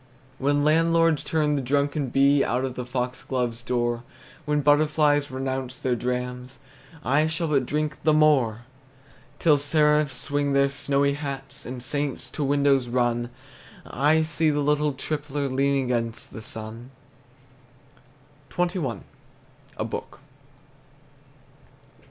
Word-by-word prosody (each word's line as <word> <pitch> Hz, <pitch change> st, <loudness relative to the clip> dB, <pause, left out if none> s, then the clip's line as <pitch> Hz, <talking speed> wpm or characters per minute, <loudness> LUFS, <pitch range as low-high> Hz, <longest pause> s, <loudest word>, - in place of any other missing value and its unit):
When 145 Hz, +1 st, +2 dB
landlords 165 Hz, 0 st, +3 dB
turn 150 Hz, -2 st, +1 dB
the 140 Hz, -, 0 dB
drunken 140 Hz, +2 st, 0 dB
bee 140 Hz, +2 st, +4 dB
Out 125 Hz, +3 st, 0 dB
of 130 Hz, -, -4 dB
the 125 Hz, -1 st, -6 dB
foxglove's 125 Hz, -1 st, -3 dB
door, 120 Hz, -1 st, -1 dB, 0.4 s
When 150 Hz, -1 st, +1 dB
butterflies 145 Hz, 0 st, +3 dB
renounce 130 Hz, -1 st, -4 dB
their 125 Hz, -1 st, 0 dB
drams, 125 Hz, +1 st, -4 dB, 0.5 s
I 145 Hz, +4 st, +3 dB
shall 165 Hz, 0 st, -2 dB
but 135 Hz, -4 st, +1 dB
drink 150 Hz, 0 st, -2 dB
the 155 Hz, -, +3 dB
more! 140 Hz, -8 st, +3 dB, 0.8 s
Till 150 Hz, -4 st, +4 dB
seraphs 150 Hz, -1 st, +2 dB
swing 145 Hz, +1 st, 0 dB
their 140 Hz, 0 st, +3 dB
snowy 140 Hz, 0 st, +1 dB
hats, 140 Hz, -1 st, -6 dB
And 125 Hz, 0 st, -6 dB
saints 145 Hz, +1 st, -3 dB
to 150 Hz, -, -3 dB
windows 140 Hz, -2 st, +2 dB
run, 120 Hz, -1 st, 0 dB, 0.6 s
To 150 Hz, +4 st, +2 dB
see 160 Hz, 0 st, +1 dB
the 145 Hz, -1 st, 0 dB
little 150 Hz, 0 st, +1 dB
tippler 145 Hz, 0 st, -3 dB
Leaning 135 Hz, 0 st, +1 dB
against 115 Hz, -1 st, -3 dB
the 110 Hz, -, -7 dB
sun! 110 Hz, +3 st, -7 dB, 1.6 s
XXI. 175 Hz, -, -2 dB, 0.8 s
A -, -, -2 dB
BOOK. -, -, -6 dB
140 Hz, 120 wpm, -25 LUFS, 125-150 Hz, 1.6 s, bee